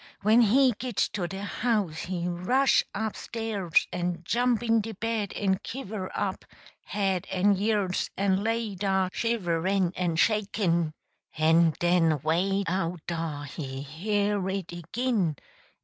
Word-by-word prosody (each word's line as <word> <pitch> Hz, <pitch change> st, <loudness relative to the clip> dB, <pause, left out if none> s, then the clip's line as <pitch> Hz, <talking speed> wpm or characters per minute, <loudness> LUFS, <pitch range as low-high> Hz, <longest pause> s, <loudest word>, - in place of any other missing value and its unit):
When 220 Hz, +4 st, +6 dB
he 255 Hz, +4 st, +5 dB
git 250 Hz, -3 st, -4 dB, 0.2 s
to 180 Hz, -4 st, -2 dB
de 195 Hz, +3 st, -6 dB
house 205 Hz, -7 st, -1 dB
he 180 Hz, -1 st, -3 dB
rush 185 Hz, +11 st, +3 dB
up 220 Hz, 0 st, -2 dB
stairs 215 Hz, -7 st, 0 dB
en 175 Hz, -1 st, -2 dB
jump 240 Hz, +4 st, +1 dB
in 230 Hz, -1 st, +3 dB
de 225 Hz, +1 st, -6 dB
bed 225 Hz, -1 st, -2 dB
en 190 Hz, -2 st, +1 dB
kiver 215 Hz, -7 st, -5 dB
up, -, -, -2 dB, 0.4 s
head 195 Hz, -3 st, -1 dB
and 195 Hz, +2 st, +3 dB
years, 200 Hz, -2 st, 0 dB
en 195 Hz, 0 st, +2 dB
lay 225 Hz, -1 st, -1 dB
dah 190 Hz, -1 st, 0 dB
shiverin' 190 Hz, -4 st, 0 dB
en 175 Hz, -2 st, 0 dB
shakin' 185 Hz, -5 st, +1 dB, 0.4 s
en 160 Hz, +1 st, +4 dB
den 170 Hz, -3 st, +3 dB
way 190 Hz, +5 st, +1 dB
out 175 Hz, -1 st, -2 dB
dah 165 Hz, -4 st, -3 dB
he 140 Hz, -2 st, -6 dB
hear 200 Hz, +5 st, -1 dB
it 190 Hz, -3 st, -4 dB
agin! 180 Hz, -, -1 dB
190 Hz, 135 wpm, -27 LUFS, 175-215 Hz, 0.4 s, When